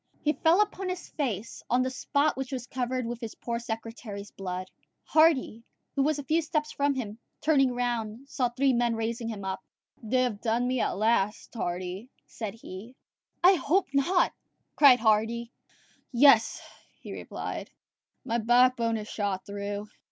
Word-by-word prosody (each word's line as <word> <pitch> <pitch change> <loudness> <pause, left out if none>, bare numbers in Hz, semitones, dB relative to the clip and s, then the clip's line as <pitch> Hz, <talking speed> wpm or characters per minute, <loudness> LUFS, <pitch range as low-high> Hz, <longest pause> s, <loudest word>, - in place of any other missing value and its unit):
He 300 - +3
fell 335 +5 +4
upon 390 -2 -1
his 365 -1 -5
face, 230 -8 -3
on 250 +1 +3
the 260 - -2
spot 285 +3 +1
which 265 0 -4
was 255 -3 -4
covered 255 0 -2
with 240 +1 -5
his 225 -2 -6
poor 235 -1 -3
secretary's 225 -3 -6
blood. 185 -1 -5 0.3
Hardy, 310 -8 +3 0.3
who 275 - +1
was 300 +2 +2
a 285 - -5
few 315 +5 +2
steps 305 -1 -1
from 285 0 +1
him, 220 -4 -5 0.2
turning 270 -5 +3
round, 240 0 -2
saw 255 -3 0
three 265 +2 +2
men 240 -1 +2
raising 225 +1 -2
him 210 -4 -5
up. 190 0 -4 0.4
"They 255 +3 +1
have 220 -5 -2
done 235 +1 +1
for - - 0
me 255 0 0
at - - 0
last, 215 -1 +1
Hardy," 185 +2 -4 0.2
said 220 -3 -6
he. 225 +2 -10 0.5
"I 370 +2 +8
hope 365 +1 +1
not," 345 +7 +3 0.4
cried 270 -4 +7
Hardy. 225 +2 +1 0.6
"Yes," 245 -3 +5 0.4
he - - -8
replied, - - -6 0.6
"my 235 -1 0
backbone 240 0 +3
is 210 -1 -6
shot 200 -4 -2
through." 205 0 -4
240 Hz, 165 wpm, -28 LUFS, 220-275 Hz, 0.6 s, I